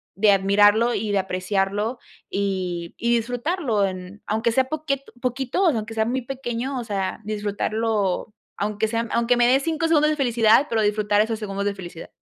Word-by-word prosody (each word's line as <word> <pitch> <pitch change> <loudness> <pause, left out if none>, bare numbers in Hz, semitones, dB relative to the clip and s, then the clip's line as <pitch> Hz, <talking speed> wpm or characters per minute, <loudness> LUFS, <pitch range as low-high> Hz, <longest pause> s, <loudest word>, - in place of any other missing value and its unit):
de 205 +1 +4
admirarlo 205 +4 +4
y 210 0 -2
de 200 - +2
apreciarlo, 195 +5 -1 0.3
y 185 -4 -3
y 235 0 +1
disfrutarlo, 245 - 0
en 185 +1 -6
aunque 220 +2 0
sea 260 +3 +3
poquet 280 -2 -2 0.2
poquito, 265 +8 0
aunque 225 -7 -1
sea 220 0 +1
muy 255 +2 -2
pequeño, 260 0 -4
o - - -4
sea, 195 -3 -2
disfrutarlo, 210 0 -1 0.2
aunque 210 +1 -1
sean 230 0 -2
aunque 235 +1 +2
me 240 - +4
de 260 +2 +5
5 325 +2 -1
segundos 305 -2 +4
de 305 - +1
felicidad, 235 -1 +4
pero 225 -1 +1
disfrutar 210 0 +2
esos 220 0 -1
segundos 200 -2 -4
de 205 - -1
felicidad. 175 -3 -9
220 Hz, 170 wpm, -23 LUFS, 200-245 Hz, 0.3 s, de